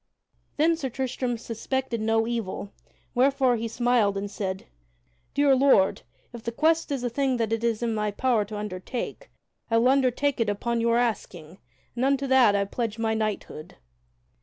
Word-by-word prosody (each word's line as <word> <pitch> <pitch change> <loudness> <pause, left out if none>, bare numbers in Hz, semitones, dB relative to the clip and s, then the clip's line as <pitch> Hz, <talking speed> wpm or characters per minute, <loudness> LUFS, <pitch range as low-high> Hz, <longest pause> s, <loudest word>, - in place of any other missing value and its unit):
Then 325 +3 +3
Sir 290 -5 -4
Tristram 250 -1 -2
suspected 235 +1 -3
no 225 0 +2
evil, 220 -4 -4 0.4
wherefore 260 0 +3
he 230 0 -3
smiled 230 -4 +1
and 200 0 -4
said: 190 -2 -4 0.7
"Dear 285 -1 +4
Lord, 260 -8 +4 0.3
if 235 - -8
the 235 - -4
quest 320 +5 +1
is 270 -3 -2
a 245 - 0
thing 265 0 0
that 225 -1 -1
it 225 0 -2
is 230 -1 0
in 230 -1 0
my 210 -1 -1
power 230 +1 +1
to 210 +1 -7
undertake, 210 - -5 0.4
I 230 - +3
will 240 +2 +4
undertake 270 +1 +2
it 230 - +1
upon 230 +3 -1
your 235 0 +2
asking, 190 -8 -3 0.4
and 240 - -1
unto 275 0 +2
that 255 -6 +5
I 200 0 +1
pledge 225 +1 -3
my 225 -1 0
knighthood." 215 -7 -4
235 Hz, 170 wpm, -26 LUFS, 215-260 Hz, 0.7 s, that